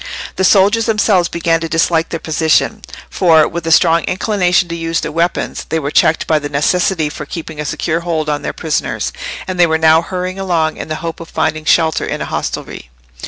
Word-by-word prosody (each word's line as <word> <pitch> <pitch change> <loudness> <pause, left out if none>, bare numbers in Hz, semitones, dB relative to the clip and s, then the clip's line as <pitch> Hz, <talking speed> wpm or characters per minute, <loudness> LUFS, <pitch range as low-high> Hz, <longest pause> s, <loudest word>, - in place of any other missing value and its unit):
The 190 - -1
soldiers 205 +4 +4
themselves 210 -5 +2
began 165 -1 0
to 165 0 -4
dislike 165 0 +1
their 165 - -4
position, 160 +8 +1 0.3
for, 160 -4 +4
with 170 -1 -5
a - - +1
strong 165 0 +4
inclination 185 -2 +1
to 170 - -3
use 165 0 -2
their - - -4
weapons, 170 +3 -2
they 160 - 0
were 145 -2 -3
checked 160 - +2
by 155 -1 +2
the 145 0 -5
necessity 160 +3 +1
for 150 0 -7
keeping 160 -1 -7
a 150 - -3
secure 160 +3 -1
hold 165 -3 -2
on 150 -1 -1
their - - -3
prisoners, 160 -2 -2 0.3
and 185 -1 -4
they 175 - +6
were 160 0 +1
now 160 0 +4
hurrying 185 +2 -4
along 165 -5 0
in - - -6
the 155 - -3
hope 165 - -5
of 165 - -10
finding 155 0 -2
shelter 160 -1 +2
in - - -3
a - - -3
hostelry. - - -5
165 Hz, 210 wpm, -15 LUFS, 160-180 Hz, 0.3 s, they